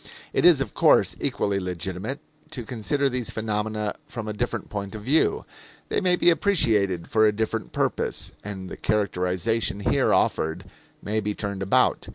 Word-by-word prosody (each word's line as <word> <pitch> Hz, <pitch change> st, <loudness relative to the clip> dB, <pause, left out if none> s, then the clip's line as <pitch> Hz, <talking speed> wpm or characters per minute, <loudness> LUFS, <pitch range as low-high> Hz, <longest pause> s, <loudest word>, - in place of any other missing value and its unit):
It -, -, +2 dB
is, 170 Hz, -6 st, +7 dB
of 125 Hz, -, -3 dB
course, -, -, +4 dB
equally 100 Hz, -1 st, 0 dB
legitimate 95 Hz, -, -4 dB, 0.3 s
to 125 Hz, -, -5 dB
consider 125 Hz, +5 st, -1 dB
these 125 Hz, -3 st, -2 dB
phenomena 105 Hz, -1 st, -2 dB
from 115 Hz, -3 st, -6 dB
a 105 Hz, -, -3 dB
different 120 Hz, 0 st, -3 dB
point 100 Hz, 0 st, -5 dB
of 105 Hz, -, -7 dB
view. 160 Hz, -, +2 dB, 0.4 s
They -, -, 0 dB
may 180 Hz, -2 st, +3 dB
be 175 Hz, -, +4 dB
appreciated 110 Hz, -, +2 dB
for 110 Hz, -1 st, +5 dB
a -, -, +4 dB
different 110 Hz, 0 st, -3 dB
purpose, -, -, -1 dB
and 95 Hz, -2 st, -6 dB
the -, -, -8 dB
characterization 100 Hz, +1 st, 0 dB
here -, -, +2 dB
offered 80 Hz, +4 st, +1 dB, 0.4 s
may 110 Hz, +2 st, -1 dB
be 105 Hz, -1 st, -2 dB
turned 100 Hz, -2 st, -4 dB
about. 95 Hz, -, +2 dB
105 Hz, 165 wpm, -25 LUFS, 100-120 Hz, 0.4 s, is